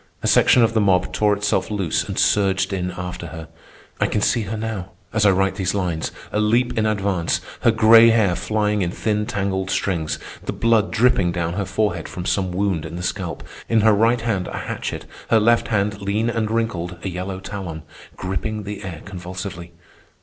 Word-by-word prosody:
A -, -, 0 dB
section 125 Hz, -, +5 dB
of 115 Hz, -, +2 dB
the 110 Hz, -, +2 dB
mob 95 Hz, -3 st, +2 dB
tore 105 Hz, -1 st, +2 dB
itself 105 Hz, +2 st, 0 dB
loose 100 Hz, -6 st, 0 dB
and -, -, -5 dB
surged 95 Hz, -1 st, +2 dB
in 90 Hz, -1 st, -2 dB
after 90 Hz, -1 st, -6 dB
her. 80 Hz, -1 st, -8 dB, 0.5 s
I -, -, +2 dB
can -, -, 0 dB
see 120 Hz, +2 st, +2 dB
her 110 Hz, +1 st, -4 dB
now, 105 Hz, -4 st, -5 dB, 0.2 s
as 105 Hz, -2 st, +3 dB
I -, -, +7 dB
write 95 Hz, 0 st, +1 dB
these 95 Hz, -1 st, -1 dB
lines, 90 Hz, -5 st, -2 dB, 0.2 s
a 105 Hz, -, 0 dB
leap 115 Hz, +4 st, +2 dB
in 110 Hz, -1 st, +1 dB
advance, 100 Hz, -5 st, 0 dB, 0.2 s
her -, -, +3 dB
gray 115 Hz, +1 st, +7 dB
hair 110 Hz, -6 st, +3 dB
flying 105 Hz, 0 st, 0 dB
in 90 Hz, -, 0 dB
thin 105 Hz, +3 st, -1 dB
tangled 95 Hz, -1 st, -2 dB
strings, 85 Hz, -5 st, -1 dB, 0.3 s
the -, -, -3 dB
blood 115 Hz, -2 st, +2 dB
dripping 115 Hz, -6 st, +3 dB
down 85 Hz, -1 st, -2 dB
her 100 Hz, +1 st, -2 dB
forehead 95 Hz, -3 st, -1 dB
from 90 Hz, -, -6 dB
some 95 Hz, -2 st, 0 dB
wound 95 Hz, -3 st, 0 dB
in 80 Hz, +1 st, -7 dB
the 90 Hz, -, -5 dB
scalp, 90 Hz, -2 st, -3 dB, 0.3 s
in 115 Hz, -1 st, +3 dB
her 110 Hz, 0 st, +5 dB
right 115 Hz, +3 st, +3 dB
hand 105 Hz, -6 st, -1 dB
a -, -, -5 dB
hatchet, -, -, -4 dB, 0.2 s
her 115 Hz, -, +5 dB
left 115 Hz, +2 st, +3 dB
hand, 100 Hz, -2 st, 0 dB
lean 105 Hz, +4 st, 0 dB
and 115 Hz, -2 st, -1 dB
wrinkled, 95 Hz, -6 st, -2 dB
a -, -, -3 dB
yellow 95 Hz, +1 st, -4 dB
talon, 95 Hz, -5 st, -6 dB, 0.3 s
gripping 105 Hz, +3 st, -3 dB
the 105 Hz, +1 st, -6 dB
air 90 Hz, -5 st, -7 dB
convulsively. 90 Hz, -1 st, -7 dB
100 Hz, 195 wpm, -21 LUFS, 90-110 Hz, 0.5 s, I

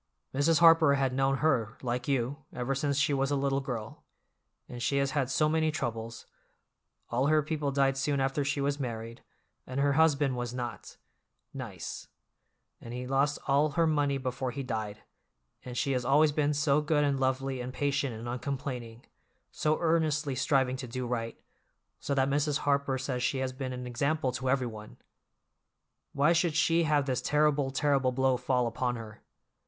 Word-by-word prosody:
Mrs. 155 Hz, +5 st, +2 dB
Harper 165 Hz, -4 st, +7 dB
had 135 Hz, -2 st, 0 dB
known 135 Hz, +1 st, +1 dB
her, 115 Hz, -8 st, +1 dB
like 125 Hz, 0 st, -2 dB
you, 135 Hz, 0 st, 0 dB
ever 125 Hz, +2 st, -2 dB
since 140 Hz, +1 st, -1 dB
she 145 Hz, 0 st, +2 dB
was 135 Hz, 0 st, +1 dB
a 145 Hz, -, +1 dB
little 135 Hz, 0 st, +1 dB
girl, 120 Hz, -5 st, -6 dB, 0.6 s
and 120 Hz, -1 st, -8 dB
she 140 Hz, +3 st, +1 dB
has 140 Hz, 0 st, +1 dB
had 135 Hz, -3 st, 0 dB
so 150 Hz, +3 st, +2 dB
many 160 Hz, 0 st, +2 dB
troubles; 115 Hz, -5 st, -4 dB, 0.9 s
all 125 Hz, +4 st, +1 dB
her 155 Hz, 0 st, +3 dB
people 150 Hz, -2 st, -2 dB
died 135 Hz, -1 st, +2 dB
soon 140 Hz, +1 st, 0 dB
after 135 Hz, +2 st, 0 dB
she 145 Hz, +1 st, -1 dB
was 140 Hz, +1 st, 0 dB
married, 115 Hz, -3 st, -5 dB, 0.5 s
and 130 Hz, +2 st, -3 dB
her 140 Hz, 0 st, +3 dB
husband 145 Hz, -3 st, +3 dB
was 120 Hz, 0 st, -4 dB
not—nice, 125 Hz, -1 st, -8 dB, 0.7 s
and 120 Hz, +1 st, -8 dB
he 125 Hz, 0 st, -4 dB
lost 135 Hz, +2 st, +1 dB
all 145 Hz, +2 st, +3 dB
her 165 Hz, +2 st, +3 dB
money 145 Hz, -3 st, +1 dB
before 130 Hz, -1 st, -3 dB
he 135 Hz, +3 st, -5 dB
died, 110 Hz, -4 st, -4 dB, 0.6 s
and 125 Hz, -1 st, -7 dB
she 140 Hz, -, 0 dB
has 125 Hz, -2 st, 0 dB
always 145 Hz, +4 st, +4 dB
been 150 Hz, 0 st, +1 dB
so 145 Hz, 0 st, +2 dB
good 150 Hz, -1 st, +1 dB
and 140 Hz, -2 st, +1 dB
lovely 130 Hz, 0 st, -1 dB
and 125 Hz, +1 st, -5 dB
patient 140 Hz, 0 st, -1 dB
and 115 Hz, +1 st, -7 dB
uncomplaining, 125 Hz, -2 st, -5 dB, 0.5 s
so 155 Hz, 0 st, 0 dB
earnestly 155 Hz, -3 st, +1 dB
striving 130 Hz, 0 st, +1 dB
to 130 Hz, -, -6 dB
do 125 Hz, +2 st, -4 dB
right, 115 Hz, -1 st, -3 dB, 0.6 s
so 140 Hz, -, -2 dB
that 135 Hz, -1 st, +2 dB
Mrs. 145 Hz, +1 st, +1 dB
Harper 140 Hz, -2 st, +1 dB
says 130 Hz, -1 st, -3 dB
she 135 Hz, -, 0 dB
has 130 Hz, -1 st, -2 dB
been 130 Hz, 0 st, -5 dB
an 125 Hz, 0 st, -5 dB
example 135 Hz, +3 st, 0 dB
to 130 Hz, +1 st, -3 dB
everyone. 120 Hz, -5 st, -2 dB, 1.1 s
Why 145 Hz, +4 st, +3 dB
should 165 Hz, -2 st, +1 dB
she 165 Hz, +1 st, +3 dB
have 150 Hz, -3 st, +2 dB
this 130 Hz, -2 st, -1 dB
terrible, 150 Hz, -2 st, +2 dB
terrible 135 Hz, -1 st, +1 dB
blow 130 Hz, 0 st, +2 dB
fall 125 Hz, 0 st, 0 dB
upon 120 Hz, +1 st, -1 dB
her? 110 Hz, -2 st, -9 dB
135 Hz, 175 wpm, -29 LUFS, 125-145 Hz, 1.1 s, Harper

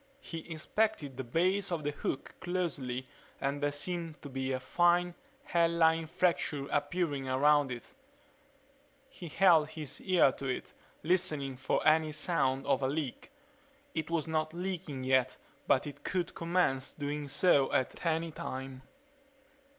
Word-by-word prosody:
He 165 Hz, -, -8 dB
inspected 160 Hz, -2 st, -1 dB
the 130 Hz, -, -3 dB
base 185 Hz, +9 st, +1 dB
of 165 Hz, -3 st, -2 dB
the 145 Hz, -, 0 dB
hook 140 Hz, -2 st, -4 dB
closely 145 Hz, -9 st, -2 dB, 0.3 s
and 140 Hz, +1 st, -2 dB
there 145 Hz, 0 st, +1 dB
seemed 165 Hz, +2 st, -3 dB
to 145 Hz, -, -7 dB
be 135 Hz, 0 st, -3 dB
a 130 Hz, -, -1 dB
fine, 175 Hz, +5 st, +2 dB, 0.3 s
hairline 165 Hz, -, +3 dB
fracture 160 Hz, -4 st, 0 dB
appearing 145 Hz, -2 st, -1 dB
around 145 Hz, +1 st, +4 dB
it. 120 Hz, -1 st, -7 dB, 1.2 s
He 180 Hz, -9 st, -9 dB
held 165 Hz, -2 st, +5 dB
his 155 Hz, -3 st, -5 dB
ear 180 Hz, -7 st, +4 dB
to 135 Hz, -, -6 dB
it, 130 Hz, -, -4 dB, 0.3 s
listening 155 Hz, -6 st, +1 dB
for 130 Hz, +4 st, 0 dB
any 155 Hz, 0 st, +4 dB
sound 135 Hz, -4 st, +1 dB
of -, -, +2 dB
a 130 Hz, -, +1 dB
leak. 145 Hz, -2 st, -3 dB, 0.6 s
It 160 Hz, -1 st, -3 dB
was 165 Hz, -3 st, 0 dB
not 155 Hz, 0 st, -1 dB
leaking 175 Hz, -7 st, -4 dB
yet 130 Hz, -1 st, +2 dB, 0.3 s
but 130 Hz, -, +3 dB
it 145 Hz, -, -9 dB
could 180 Hz, -2 st, -2 dB
commence 165 Hz, -6 st, 0 dB
doing 145 Hz, 0 st, -3 dB
so 140 Hz, -2 st, +4 dB
at 130 Hz, -, -1 dB
any 165 Hz, 0 st, 0 dB
time. 130 Hz, -2 st, -6 dB
155 Hz, 145 wpm, -32 LUFS, 135-170 Hz, 1.2 s, held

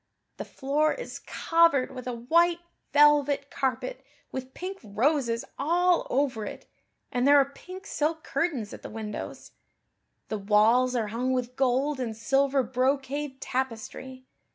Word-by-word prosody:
The -, -, -5 dB
floor 295 Hz, +3 st, 0 dB
is -, -, -7 dB
covered 330 Hz, -6 st, +2 dB
with 255 Hz, -1 st, -8 dB
a 250 Hz, -, -2 dB
white 335 Hz, +9 st, +3 dB, 0.3 s
velvet 290 Hz, -1 st, +4 dB
carpet 265 Hz, -, -2 dB, 0.3 s
with 260 Hz, 0 st, -6 dB
pink 380 Hz, +2 st, -6 dB
roses 230 Hz, +2 st, 0 dB
all 350 Hz, +5 st, +2 dB
over 260 Hz, -5 st, 0 dB
it -, -, -7 dB, 0.5 s
and 250 Hz, +2 st, +1 dB
there 285 Hz, 0 st, +7 dB
are 275 Hz, -, +6 dB
pink 365 Hz, +7 st, -11 dB
silk 315 Hz, -1 st, -1 dB
curtains 270 Hz, -12 st, -2 dB
at -, -, -9 dB
the -, -, -8 dB
windows. 215 Hz, -1 st, -7 dB, 0.8 s
The 215 Hz, -, -2 dB
walls 220 Hz, +5 st, +3 dB
are 220 Hz, -3 st, 0 dB
hung 250 Hz, +4 st, -1 dB
with 250 Hz, -1 st, -2 dB
gold 265 Hz, +2 st, +1 dB
and 225 Hz, -4 st, -3 dB
silver 270 Hz, +3 st, +2 dB
brocade 265 Hz, +3 st, -1 dB
tapestry. 260 Hz, +1 st, -4 dB
265 Hz, 140 wpm, -27 LUFS, 245-295 Hz, 0.8 s, there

